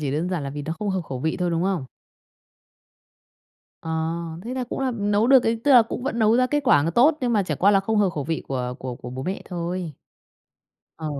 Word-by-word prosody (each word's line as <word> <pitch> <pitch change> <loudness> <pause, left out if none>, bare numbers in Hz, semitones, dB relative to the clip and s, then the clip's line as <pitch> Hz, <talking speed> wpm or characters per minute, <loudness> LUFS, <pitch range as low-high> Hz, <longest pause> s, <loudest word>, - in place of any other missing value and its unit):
chỉ 145 -3 -2
đơn 160 +5 -1
giản 175 -5 -2
là 140 - -4
vì 145 +1 -6
nó 160 +3 -3
không 210 -2 -2
hợp 190 - -1
khẩu 130 -5 -6
vị 160 +2 -1
thôi, 180 -1 -1
đúng 165 +1 0
không? 185 -7 -1 2.0
Ờ, 160 - -6 0.5
thế 250 +2 -4
là 255 -1 -2
cũng 245 - -5
là, 265 - 0
ừ, 255 - -1
nấu 205 +2 +1
được 265 -2 +6
ấy. 225 0 0
Tức 290 - +3
là 245 -2 +9
cũng 245 +2 -6
vẫn 240 -3 -2
nấu 220 +1 +4
ra 255 0 +3
kết 295 +2 0
quả 145 - +5
nó 165 - 0
tốt, 295 - +4
nhưng 245 -2 0
mà 205 -3 +3
chẳng 150 -6 -3
qua 200 +2 +5
là 195 -1 +4
không 220 +2 -1
hợp 195 -3 +3
khẩu 145 -4 -4
vị 160 +1 -2
của 125 -2 -3
của 130 -1 -5
của 120 - -9
bố 130 +1 -6
mẹ 190 +5 -4
thôi. 175 -2 -4 1.1
Ờ. 160 - -5
185 Hz, 255 wpm, -23 LUFS, 155-230 Hz, 2.0 s, là